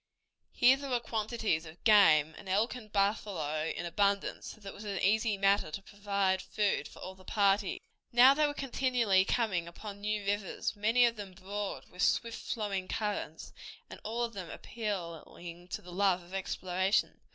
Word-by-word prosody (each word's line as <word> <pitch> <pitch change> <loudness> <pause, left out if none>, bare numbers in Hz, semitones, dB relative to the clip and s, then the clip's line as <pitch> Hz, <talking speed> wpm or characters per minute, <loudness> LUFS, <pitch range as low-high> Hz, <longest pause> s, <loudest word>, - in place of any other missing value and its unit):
Here 260 +2 +5
there 280 0 -6
were 245 -2 +1
quantities 220 -7 -1
of 160 +2 -14
game, 160 -8 +6
and 190 - -11
elk 210 +5 +2
and 220 -5 -10
buffalo 195 -7 0
in 175 - -4
abundance, 200 +3 0
so - - -9
that 200 -2 -8
it - - -9
was 210 - -10
an 200 -2 -3
easy 215 +2 +2
matter 195 -4 +3
to 155 +6 -6
provide 200 -2 -1
food 210 -2 -1
for - - -15
all 185 - -6
the 190 0 -18
party. 200 0 +1 0.3
Now 250 +3 +8
they 300 +1 +3
were 290 - -4
continually 245 -8 +2
coming 190 -9 0
upon 200 +4 -9
new 210 0 -2
rivers, 205 +1 -2
many 225 +4 +4
of 230 -1 0
them 200 -3 -7
broad, 200 +2 -5
with 180 - -7
swift 230 +2 +1
flowing 200 -4 -2
currents, 205 -8 -4 0.4
and - - -9
all 230 +3 -2
of 230 -1 -3
them 185 -4 -7
appealing 175 -4 -6
to - - -6
the 180 - -11
love 185 -1 +2
of 175 +2 -15
exploration. 190 0 0
200 Hz, 180 wpm, -31 LUFS, 185-220 Hz, 0.4 s, Now